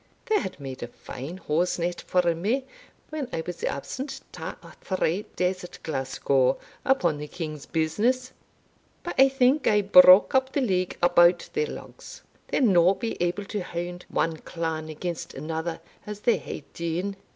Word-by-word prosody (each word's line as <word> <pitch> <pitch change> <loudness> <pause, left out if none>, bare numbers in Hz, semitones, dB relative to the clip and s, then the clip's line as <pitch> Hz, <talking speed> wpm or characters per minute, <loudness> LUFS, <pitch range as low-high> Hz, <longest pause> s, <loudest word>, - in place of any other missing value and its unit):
They 430 -1 +2
had 190 - -6
made 135 -2 -7
a 120 - -4
fine 140 +7 -8
hosenet 175 +1 -1
for 180 -2 +2
me 220 +11 -1 0.4
when 300 -5 -4
I 160 - -2
was 175 -1 -6
absent 265 - -4
twa - - -6
or - - -13
three 190 +2 -1
days 180 0 0
at 180 - -9
Glasgow, 135 -2 +1 0.3
upon 175 - +2
the 150 - -5
king's 155 -3 -6
business 230 +12 0 0.7
But 350 - -4
I 270 0 +8
think 265 +2 +3
I 210 -1 +4
broke 185 0 +8
up 265 0 +2
the 285 - +1
league 185 -7 0
about 175 0 +5
their 450 +1 0
lugs - - -10 0.2
they'll - - +1
no 185 -4 +5
be 225 +4 -3
able 175 +3 0
to 205 0 -3
hound 175 0 -5
one 165 -1 0
clan 160 -1 -4
against 170 +2 -5
another 160 +1 -4 0.3
as 210 0 -6
they 235 - +3
hae - - -7
dune. 170 +4 -2
180 Hz, 165 wpm, -26 LUFS, 165-215 Hz, 0.7 s, I